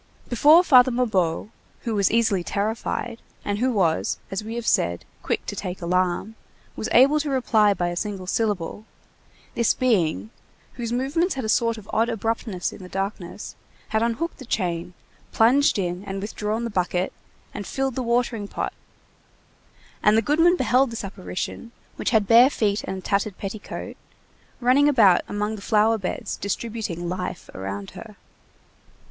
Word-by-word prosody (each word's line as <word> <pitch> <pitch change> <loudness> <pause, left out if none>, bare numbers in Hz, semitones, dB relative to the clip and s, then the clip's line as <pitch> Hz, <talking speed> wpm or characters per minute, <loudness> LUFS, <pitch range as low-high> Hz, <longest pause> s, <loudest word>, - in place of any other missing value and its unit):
Before 300 +8 +6
Father 255 -6 +6
Mabeuf, 210 -8 0 0.3
who 230 - -3
was 200 -3 +2
easily 220 -5 +2
terrified, 220 +4 -3 0.2
and 205 0 -1
who 255 +2 +2
was, 180 -8 +1
as 195 +2 -3
we 225 +2 -6
have 235 -1 -4
said, 85 - +1 0.2
quick - - -2
to - - -5
take 180 0 -5
alarm, 180 +4 0 0.4
was - - -4
able 280 +5 +6
to 300 -1 -2
reply 220 -6 +3
by 175 -1 -1
a 175 - -4
single 195 0 -4
syllable, 205 0 -2 0.7
this 235 -2 +2
being, 165 - +1 0.4
whose 235 -2 -5
movements 280 +9 0
had 260 -4 -3
a - - -3
sort 230 0 +2
of 205 -2 -12
odd 230 +2 +2
abruptness 225 -4 -2
in - - -11
the 180 - -10
darkness, 195 -1 -5 0.3
had 220 0 +1
unhooked 235 +10 -2
the 260 - -9
chain, 180 -5 -2 0.4
plunged 255 +4 +4
in 180 -1 -2
and 195 0 -4
withdrawn 210 +2 -3
the 235 - -3
bucket, 180 -1 -1 0.4
and 205 - -6
filled 270 -1 -1
the 260 - -3
watering 235 -3 0
pot, - - -4 1.3
and 210 +1 +4
the 225 - +3
goodman 330 - +4
beheld 260 -3 +3
this 230 0 -5
apparition, 195 +3 -6 0.3
which - - -1
had 220 -3 +3
bare 235 +4 +7
feet 210 -6 0
and 190 - -4
a - - -7
tattered 200 +1 -1
petticoat, 200 +1 -6 0.6
running 265 +4 +4
about 210 -10 +5
among 210 +1 -2
the 205 - -9
flower 220 +1 +2
beds 185 - -4
distributing 200 -4 -4
life 180 0 -5
around 95 +1 -6
her. - - -11
215 Hz, 160 wpm, -24 LUFS, 185-235 Hz, 1.3 s, bare